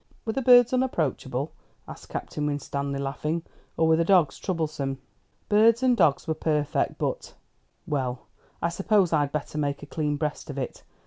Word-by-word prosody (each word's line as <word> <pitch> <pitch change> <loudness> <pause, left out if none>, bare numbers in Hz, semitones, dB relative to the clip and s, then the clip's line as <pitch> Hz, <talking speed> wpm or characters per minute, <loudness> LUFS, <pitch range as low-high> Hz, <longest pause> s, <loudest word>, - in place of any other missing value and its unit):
"Were 220 - -1
the 270 - -1
birds 245 -1 +6
unapproachable?" 155 - -1 0.4
asked - - -11
Captain 150 -1 -3
Winstanley, 140 -1 -3
laughing; 150 +4 -2 0.3
"or 160 - +3
were 160 - +5
the 170 - +3
dogs 175 -4 +3
troublesome?" 155 -7 -2 0.5
"Birds 225 +3 +4
and 255 -1 +4
dogs 145 -10 +2
were 160 - +1
perfect; 150 -2 0
but - - -3 0.5
Well, 130 -4 -2 0.4
I 170 - +2
suppose 190 0 +2
I'd 145 -2 +2
better 150 0 -3
make 145 -1 -2
a - - -5
clean 150 -1 -2
breast 150 0 -3
of 140 - -6
it. 130 - -4
155 Hz, 165 wpm, -26 LUFS, 140-190 Hz, 0.5 s, birds